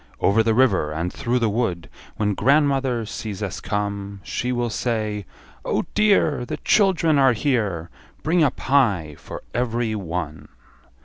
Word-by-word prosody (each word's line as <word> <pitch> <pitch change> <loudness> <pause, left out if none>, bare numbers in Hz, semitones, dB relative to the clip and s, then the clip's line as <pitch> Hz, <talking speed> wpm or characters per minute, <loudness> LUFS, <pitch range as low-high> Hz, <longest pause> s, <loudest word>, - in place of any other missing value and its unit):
Over 105 +3 +3
the 110 0 +2
river, 100 -12 +3
and 85 +3 -3
through 120 +1 -1
the 115 -2 +2
wood 95 -7 -1 0.3
When 105 -1 +1
grandmother 135 -1 +2
sees 105 -2 -5
us 100 - -4
come, 100 -1 -3
She 125 +9 -2
will 120 -2 -1
say, 105 -4 -2 0.4
Oh - - -1
dear, 200 -10 +3
The 120 - -4
children 170 -7 +3
are 135 -2 +5
here, 105 - -1 0.3
Bring 165 +2 +2
a 145 - +5
pie 105 - +1
for - - -9
every 120 -2 -1
one. 85 -6 -4
115 Hz, 145 wpm, -22 LUFS, 100-130 Hz, 0.4 s, are